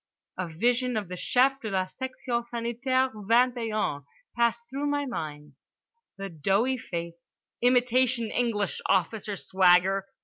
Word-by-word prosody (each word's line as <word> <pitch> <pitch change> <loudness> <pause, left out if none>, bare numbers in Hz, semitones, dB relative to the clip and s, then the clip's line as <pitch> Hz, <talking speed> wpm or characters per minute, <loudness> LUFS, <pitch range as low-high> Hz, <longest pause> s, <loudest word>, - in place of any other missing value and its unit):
A 185 - -3
vision 240 +8 0
of 205 -4 -3
the 180 - -5
Chef 265 +8 +2
de 220 - -4
la 190 -2 0
section 255 -2 -3
Sanitaire 240 +3 -1
Ving 230 +4 +3
et 230 -2 -3
Un 145 -9 -1 0.3
passed 235 0 +1
through 275 +4 -3
my 290 0 0
mind. 150 - -6 0.6
The 195 0 -5
doughy 195 - 0
face. 170 -3 -7 0.3
Imitation 245 -1 +2
English 220 -5 -1
officer 200 +3 +1
swagger. 190 +1 +3
230 Hz, 135 wpm, -27 LUFS, 190-250 Hz, 0.6 s, Ving